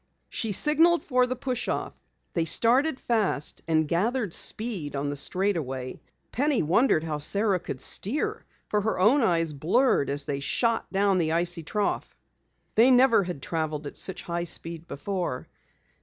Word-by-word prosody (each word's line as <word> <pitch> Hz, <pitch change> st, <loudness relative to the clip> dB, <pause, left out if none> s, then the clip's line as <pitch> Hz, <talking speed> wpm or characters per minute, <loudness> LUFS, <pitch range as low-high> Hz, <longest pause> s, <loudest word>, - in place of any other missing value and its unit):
She 225 Hz, -, -2 dB
signaled 325 Hz, -, +4 dB
for 250 Hz, -2 st, +2 dB
the 255 Hz, -, -2 dB
push 250 Hz, -1 st, -4 dB
off. -, -, -3 dB, 0.4 s
They 165 Hz, -2 st, 0 dB
started 255 Hz, -, +3 dB
fast 215 Hz, -10 st, -1 dB
and 160 Hz, -1 st, +2 dB
gathered 210 Hz, -, -1 dB
speed 200 Hz, -11 st, -1 dB
on 145 Hz, +1 st, -2 dB
the -, -, -4 dB
straightaway. 145 Hz, -7 st, -2 dB, 0.3 s
Penny 280 Hz, -, +1 dB
wondered 165 Hz, -, +2 dB
how 155 Hz, -2 st, -3 dB
Sara 200 Hz, +5 st, +2 dB
could 135 Hz, -6 st, -7 dB
steer 360 Hz, -, 0 dB, 0.2 s
for 210 Hz, -, 0 dB
her 220 Hz, +2 st, -1 dB
own 230 Hz, +10 st, +4 dB
eyes 165 Hz, -7 st, +1 dB
blurred 160 Hz, -, +1 dB
as 140 Hz, 0 st, -2 dB
they 140 Hz, -1 st, -3 dB
shot 230 Hz, -, 0 dB
down 195 Hz, -1 st, +2 dB
the 160 Hz, -1 st, 0 dB
icy 170 Hz, 0 st, -1 dB
trough. 205 Hz, +6 st, -3 dB, 0.6 s
They 230 Hz, +4 st, +5 dB
never 250 Hz, -5 st, +5 dB
had 175 Hz, -7 st, -6 dB
traveled 155 Hz, -2 st, -3 dB
at 145 Hz, -, -7 dB
such 190 Hz, -, -4 dB
high 170 Hz, 0 st, -3 dB
speed 165 Hz, 0 st, -3 dB
before. 175 Hz, -4 st, -4 dB
185 Hz, 155 wpm, -26 LUFS, 160-240 Hz, 0.6 s, They